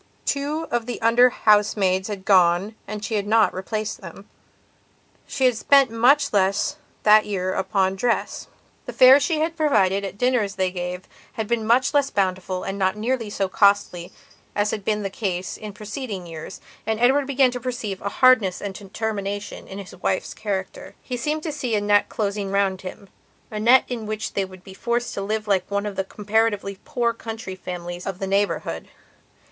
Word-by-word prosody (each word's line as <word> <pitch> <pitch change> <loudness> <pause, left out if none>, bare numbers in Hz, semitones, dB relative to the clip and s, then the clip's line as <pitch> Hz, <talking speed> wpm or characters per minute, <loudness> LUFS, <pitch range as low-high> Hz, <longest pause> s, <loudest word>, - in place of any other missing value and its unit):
Two 295 +3 -1
of 240 -1 -1
the 245 - -4
under 235 +2 +5
housemaids 205 -4 +2
had 200 -3 -6
gone 185 +1 +4
and 210 +1 -5
she 225 - -4
had 205 -1 -1
not 220 0 +4
replaced 215 +3 -4
them; 190 +2 -11 1.0
she 265 - 0
had 250 -2 +4
spent 275 +2 +4
much 270 +5 +3
less 200 +1 +1 0.3
that 215 0 +6
year 185 -2 -2
upon 190 0 0
dress. 235 +3 -1 0.4
The - - -5
fare 260 +2 +8
she 310 +1 0
had 325 +1 -1
provided 200 - +2
at 195 -2 -4
the - - -22
dinners 235 -5 +1
they 185 -1 0
gave 180 0 -5 0.3
had 220 -2 -3
been 225 -1 -1
much 255 +5 +3
less 285 -1 +3
bountiful 185 -1 -1
and 195 +1 -4
not 190 0 +1
nearly 230 0 -1
so 195 -1 -1
costly 190 -3 +2 0.4
as 205 0 +1
had 210 - -4
been 210 +1 -1
the 195 - -3
case 185 -3 -3
in 215 -1 -8
preceding 210 -1 -6
years, 165 -2 -9 0.3
and 220 0 0
Edward 265 +3 +3
began 270 -2 +3
to 245 - -5
perceive 225 -6 -4
a 200 - -2
hardness 240 -7 +4
and 200 -1 -5
determination 205 0 -5
in 190 - -8
his 200 -2 -9
wife's 185 +1 -2
character. 195 -3 -5
He 250 - -4
seemed 300 +6 -2
to 320 - -3
see 260 -6 -2
a - - +2
net 205 0 +2
closing 200 -2 -2
round 195 -1 +1
hima 190 +2 -9 0.4
net 230 +5 +5
in 230 -4 -5
which 215 +1 -4
they 195 - 0
would 185 -1 -14
be 190 - -11
forced 235 +4 -2
to - - -4
live 215 +2 -2
like 195 -3 +1
one 200 0 -1
of 205 -2 -4
the 195 - -1
comparatively 205 -1 -1
poor 235 -2 0
county 225 -4 -7
families 175 -1 -7
of 195 -2 -3
the 195 - -3
neighbourhood. 200 +1 -1
210 Hz, 185 wpm, -23 LUFS, 195-235 Hz, 1.0 s, fare